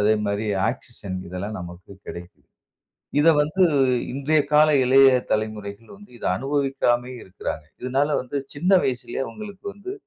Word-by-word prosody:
அதே 105 +1 +4
மாரி 100 +2 -1 0.2
ஆக்ஸிஜன் 105 -7 -7
இதெல்லாம் 100 +4 -5
நமக்கு 90 +2 -10 0.2
கிடைக்குது. 85 +1 -10 0.8
இதை 165 - +6
வந்து 180 +5 +2 0.5
இன்றைய 145 +3 +2
கால 150 +1 +6 0.2
இளைய 135 +1 +7 0.2
தலைமுறைகள் 110 0 -3
வந்து 205 +1 -16
இதை - - -5
அனுபவிக்காமையே 135 -1 0
இருக்கிறாங்க. 90 -4 -6 0.2
இதுனால 135 +3 0
வந்து 125 +3 -6 0.2
சின்ன 175 +6 0
வயசிலே 125 0 -3
அவங்களுக்கு 205 -3 -10
வந்து, 205 - -8
125 Hz, 130 wpm, -23 LUFS, 105-145 Hz, 0.8 s, இளைய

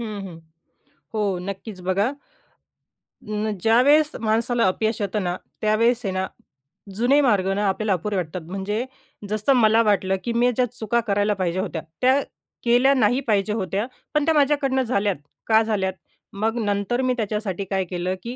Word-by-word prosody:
हं, 215 -3 -5
हं. 170 -3 -10 0.8
हो 215 - -1 0.2
नक्कीच 195 +1 -7
बघा. 195 +3 +2 1.3
अं, 215 +1 -1
ज्यावेळेस 285 +7 +4
माणसाला 230 +2 +1
अपयश 220 +4 -1
येतं 205 0 -1
ना, 175 -1 -1 0.3
त्यावेळेस 230 +3 +2
आहे 190 - -1
ना, 190 0 -1 0.7
जुने 245 +7 +3
मार्ग 205 -9 +2
ना 205 +1 0
आपल्याला 200 +1 0
अपुरे 200 +4 -2
वाटतात. 180 0 -3
म्हणजे 205 +5 -2 0.4
जसं 215 +5 +2
मला 225 -2 +5
वाटलं, 195 -3 +2
की 235 - -2
मी 240 +1 +3
ज्या 250 - +3
चुका 235 -1 0
करायला 205 +1 +2
पाहिजे 180 0 0
होत्या, 180 -4 -3 0.2
त्या 260 +2 +4 0.4
केल्या 245 +3 +4
नाही 260 -1 +3
पाहिजे 210 -1 +1
होत्या. 200 0 -1 0.3
पण 300 -1 +2
त्या 325 - +3
माझ्याकडनं 280 -3 +2
झाल्यात, 205 -5 0 0.3
का 220 0 +5
झाल्यात? 200 -4 -1 0.4
मग 220 +3 -1
नंतर 205 +4 0
मी 255 -1 +1
त्याच्यासाठी 210 -3 -2
काय 190 0 -1
केलं? 180 +1 -3
की 240 +1 -5
215 Hz, 160 wpm, -23 LUFS, 195-240 Hz, 1.3 s, मला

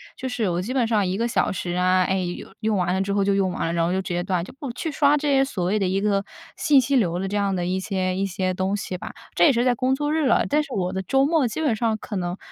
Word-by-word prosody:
就 260 - -5
是 235 -4 -1
我 175 +1 -1
基 235 +7 -4
本 250 -4 +2
上 210 -4 +2
1 185 +2 -1
个 235 - 0
小 235 - +1
时 175 -1 -4
啊， 185 +1 +3
哎， 190 +1 0
用 175 -1 -5
用 215 -1 +1
完 180 0 0
了 190 - 0
之 200 +1 -2
后 200 0 +2
就 200 0 +2
用 195 -2 +1
完 - - -3
了， 165 - -2
然 170 -1 +1
后 170 - 0
就 190 +1 0
直 185 - -5
接 175 0 -1
断。 180 -2 -1
就 - - -12
不 275 -4 -4
去 315 +6 -4
刷 290 0 +3
这 295 0 -1
些 270 -1 +4
所 195 -10 -3
谓 205 +4 +1
的 195 - +1
一 190 +1 0
个 200 -1 +1 0.3
信 290 -3 +4
息 270 +2 +1
流 180 -9 +2
的 195 - -2
这 200 - -4
样 200 -2 +1
的 175 - -2
一 185 +1 -1
些 185 -1 -2
一 195 +1 0
些 185 -1 -2
东 190 +2 -1
西 190 -2 -5
吧。 - - -7 0.2
这 - - +5
也 310 - +6
是 240 -1 +1
在 250 - +4
工 255 +3 +1
作 295 +2 -1
日 315 -2 +1
了， 255 - +3
但 300 +1 +2
是 280 - -12
我 185 -3 -1
的 190 - -2
周 270 +8 +2
末 305 -3 +2
基 220 - -5
本 285 -8 +1
上 220 0 0
可 210 - -7
能 180 0 -2
200 Hz, 340 characters per minute, -23 LUFS, 185-255 Hz, 0.3 s, 也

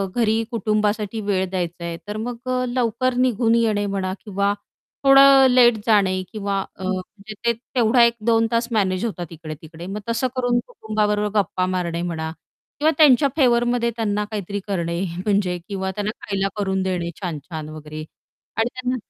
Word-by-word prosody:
घरी 225 -1 +2
कुटुंबासाठी 215 -1 0
वेळ 190 -1 +2
द्यायचा 175 -2 -3
आहे 170 -1 -4
तर 210 +1 -4
मग 235 +2 -4
अ, 255 0 +1
लवकर 245 +1 0
निघून 240 -2 +2
येणे 215 -3 +2
म्हणा 195 -2 -2
किंवा 200 -1 0 0.5
थोडं 275 0 +8
लेट 250 -1 +6
जाणे 195 -4 +3
किंवा 200 -2 -2 0.2
अ, 190 - -10
म्हणजे 190 +3 -5
ते 235 - +4 0.2
तेवढा 240 0 +5
1-2 230 -1 +2
तास 230 0 +1
मॅनेज 190 -2 +1
होतात 190 -6 -4
इकडे 160 -1 -7
तिकडे 160 +2 -10
मग 200 +2 -4
तसं 230 +3 +1
करून 245 -1 +1
कुटुंबाबरोबर 210 - 0
गप्पा 185 -1 0
मारणे 175 -2 -2
म्हणा 160 -2 -3 0.5
किंवा 310 +2 +4
त्यांच्या 285 -3 +6
फेवरमध्ये 240 -3 +3
त्यांना 210 -2 -1
काहीतरी 205 -1 -3
करणे 170 -3 -2 0.3
म्हणजे 195 -4 +1
किंवा 190 -2 -3
त्यांना 205 +2 -2
खायला 195 -1 -1
करून 190 -2 0
देणे 180 -2 -2
छान-छान 160 -3 -5
वगैरे 155 0 -8 0.5
आणि 225 +2 +2
त्यांना 255 0 -2
210 Hz, 155 wpm, -22 LUFS, 185-235 Hz, 0.5 s, थोडं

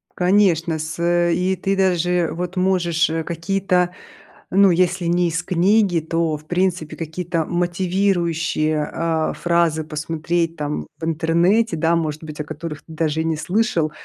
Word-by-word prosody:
Конечно, 180 -4 +2
с, 155 +2 -5
э, 175 0 +2
и 185 +1 +1
ты 195 +2 -1
даже 180 -2 +1
вот 180 +2 -4
можешь, 175 -3 +2
э, 160 0 -2
какие-то, 180 +2 0 0.6
ну, 195 0 +5
если 180 0 +1
не 175 +1 +2
из 165 +2 -2
книги, 185 0 +2
то 160 -1 -1
в 155 - -18
принципе 175 -3 -1
какие-то 165 0 -3
мотивирующие, 175 -4 0
а, 165 -1 -1
фразы 170 -2 +1
посмотреть 165 +2 -2
там 150 -1 -4
в 160 - -4
интернете, 170 +6 +2
да, 165 +1 +2
может 155 -1 -2
быть, 155 -1 -9
о 150 - -1
которых 155 0 -7
ты 160 - -13
даже 160 0 0
и - - -2
не 160 -1 0
слышал, 175 -2 0
170 Hz, 155 wpm, -21 LUFS, 160-180 Hz, 0.6 s, ну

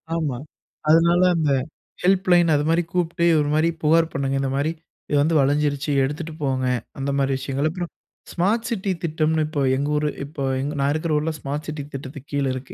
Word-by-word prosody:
ஆமா, 150 -7 -1 0.5
அதனால 170 +2 +5
அந்த 155 -3 +1 0.5
ஹெல்ப்லைன்னு 180 -3 +4
அதுமாரி 165 +4 +1
கூப்பிட்டு, 170 -1 0
ஒரு 145 -1 0
மாரி 155 +2 +3
புகார் 160 +2 +3
பண்ணுங்க. 135 0 -1
இந்த 135 - -1
மாரி, 145 +3 0 0.4
இது 145 - +2
வந்து 160 +3 +2
வழிஞ்சிருச்சு 145 +1 +1
எடுத்துட்டு 155 +4 -3
போங்க. 130 -2 0 0.3
அந்த 135 +1 -2
மாரி 135 0 +1
விஷயங்கள். 135 +2 -1
அப்புறம், 175 +1 -5 0.4
ஸ்மார்ட் 210 +7 0
சிட்டி 200 -4 -1
திட்டம்னு 155 -1 +1
இப்ப 155 -2 -2
எங்க 140 +2 -1
ஊரு 150 0 +1 0.2
இப்போ 145 -1 -6 0.2
எங் 140 +2 -2
நான் 140 +1 +2
இருக்கிற 155 +1 -2
ஊரில 155 +2 0
ஸ்மார்ட் 145 +2 -4
சிட்டி 150 -2 -4
திட்டத்துக்கு 140 +1 -8
கீழ 140 -1 0
இருக்கு. 130 +1 -8
150 Hz, 175 wpm, -23 LUFS, 140-165 Hz, 0.5 s, அதனால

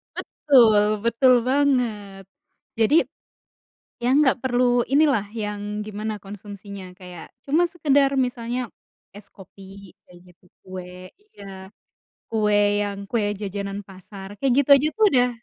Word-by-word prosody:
Betul, 215 -7 +3
betul 255 +2 +4
banget. 240 -8 -1 0.6
Jadi, 225 +8 +3 1.1
yang 255 +3 +2
nggak 260 -1 +2
perlu 245 -1 +2
ini 295 +3 +4
lah, 230 -9 +1
yang 210 -1 -5
gimana 215 0 -5
konsumsinya. 200 -1 -10
Kayak, 180 -2 -11 0.2
cuma 310 +5 +2
sekedar 285 -5 +1
misalnya 245 0 -5 0.5
es 205 0 -12
kopi, 195 0 -15
kayak 175 -1 -18
gitu. 175 - -50 0.2
Kue— 185 0 -10
iya. 195 - -13 0.6
Kue 210 -2 +1 0.2
yang 200 -1 -5
kue 230 -3 0 0.2
jajanan 200 0 -5
pasar. 195 +1 -12
Kayak 270 -2 +1
gitu - - -16
aja 280 +3 +1
tuh, 440 - +2
udah 250 -1 +3
210 Hz, 125 wpm, -22 LUFS, 195-250 Hz, 1.1 s, betul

